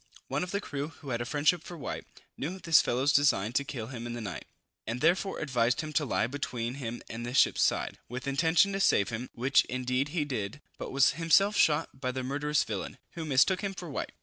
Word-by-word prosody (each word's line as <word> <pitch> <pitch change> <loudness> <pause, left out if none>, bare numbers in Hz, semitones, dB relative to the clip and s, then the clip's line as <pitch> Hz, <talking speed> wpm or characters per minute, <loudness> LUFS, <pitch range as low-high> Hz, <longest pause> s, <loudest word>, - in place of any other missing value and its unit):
One - - -1
of 180 - -3
the 200 - -1
crew, 145 -6 -4
who 145 -4 -9
had 120 -1 -1
a - - -2
friendship 150 +6 +2
for 175 - -9
White, 145 - -5 0.3
knew 170 +7 -4
this 165 -4 +5
fellow's 130 +4 +1
design 120 -7 +3
to 140 - +2
kill 125 -5 -5
him 120 -1 -5
in 120 - -5
the 120 - -5
night, 95 - -6 0.4
and 115 +2 -2
therefore 180 +6 +2
advised 125 -4 +1
him 155 -1 -6
to 150 - +2
lie 120 - +1
between 120 -2 -3
him 120 -1 -5
and 115 +1 -6
the 120 +2 -4
ship's - - +4
side, - - +1
with 125 +3 -5
intention 160 +7 +3
to 195 - -1
save 100 - +3
him; 115 +2 -5
which 130 +3 +3
indeed 125 +2 -1
he 150 -1 -1
did, 125 -2 -4 0.2
but - - -5
was 135 0 +4
himself 195 +5 +3
shot 155 -3 +3
dead 130 - -23
by 130 -1 -1
the 130 0 -4
murderous 145 +3 0
villain, - - -5
who 165 - -6
mistook 150 +6 +3
him 195 -1 -3
for 175 -4 -7
White. - - -4
140 Hz, 230 wpm, -29 LUFS, 125-160 Hz, 0.4 s, this